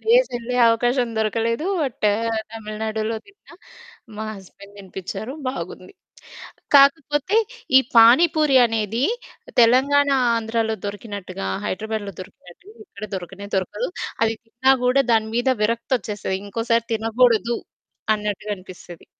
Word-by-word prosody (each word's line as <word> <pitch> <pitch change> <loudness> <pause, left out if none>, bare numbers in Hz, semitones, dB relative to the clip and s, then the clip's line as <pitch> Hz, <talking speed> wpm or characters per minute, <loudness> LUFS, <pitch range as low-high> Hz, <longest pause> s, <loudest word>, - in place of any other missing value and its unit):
ప్లేసెళ్ళే 250 - +1
అవకాశం 245 +2 +1
దొరకలేదు. 230 - -1 0.2
బట్ 240 -6 -1 0.5
తమిళనాడులో 220 0 -4
తిన్నా, 400 -4 -19 0.6
మా 220 - -4
హస్బెండ్ 200 +1 -15
తినిపించారు. 195 +5 -7 0.2
బాగుంది. 185 -5 -7 0.8
కాకపోతే, 295 +5 +4 0.4
ఈ - - +11 0.2
పానీపూరి 285 +4 +6
అనేది, 225 +2 -1 0.6
తెలంగాణ 275 +5 +4 0.3
ఆంధ్రాలో 225 0 -1
దొరికినట్టుగా, 200 - -6 0.2
హైదరాబాద్‌లో 215 0 -4
దొరికినట్టుగా 185 - -14
ఇక్కడ 210 - -10
దొరకనే 195 +2 -7
దొరకదు. 190 0 -2 0.3
అది 225 0 +2
తిన్నా 240 +4 +2
కూడా 265 +2 +4
దాని 220 -1 +2
మీద 245 +2 +2
విరక్తొచ్చేస్తది. 215 -3 -1
ఇంకోసారి 230 +2 0
తినకూడదు 230 +1 +2 0.6
అన్నట్టుగా 210 0 -4
అనిపిస్తది. 180 -2 -13
225 Hz, 100 wpm, -22 LUFS, 205-250 Hz, 0.8 s, ఈ